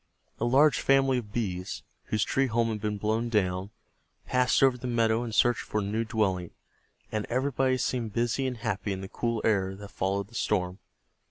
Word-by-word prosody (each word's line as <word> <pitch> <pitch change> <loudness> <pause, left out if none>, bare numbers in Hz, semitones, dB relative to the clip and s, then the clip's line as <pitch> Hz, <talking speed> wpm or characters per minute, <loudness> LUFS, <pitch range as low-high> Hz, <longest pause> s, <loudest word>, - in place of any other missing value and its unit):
A 115 - 0
large 140 +5 +4
family 135 -1 +3
of 105 -4 -10
Bees, 95 -5 -3 0.2
whose 110 -1 0
tree 135 0 +1
home 115 0 +1
had 110 -2 -3
been 105 -1 -1
blown 110 +3 0
down, 95 -3 0 0.6
passed 125 +1 +2
over 135 -2 +5
the 125 +1 -6
meadow 115 -1 +2
in 120 - -5
search 120 +1 +3
for 105 - -2
a - - -1
new 110 +3 -1
dwelling, 95 -6 0 0.6
and 110 -1 -2
everybody 130 +1 +1
seemed 120 -3 -1
busy 120 +4 0
and 125 -2 -3
happy 110 -3 -2
in 95 - -5
the 95 - -6
cool 115 -2 -2
air 95 -3 +1
that 100 +1 -10
followed 100 +1 -1
the - - -20
storm. 95 -4 -1
110 Hz, 190 wpm, -28 LUFS, 100-125 Hz, 0.6 s, over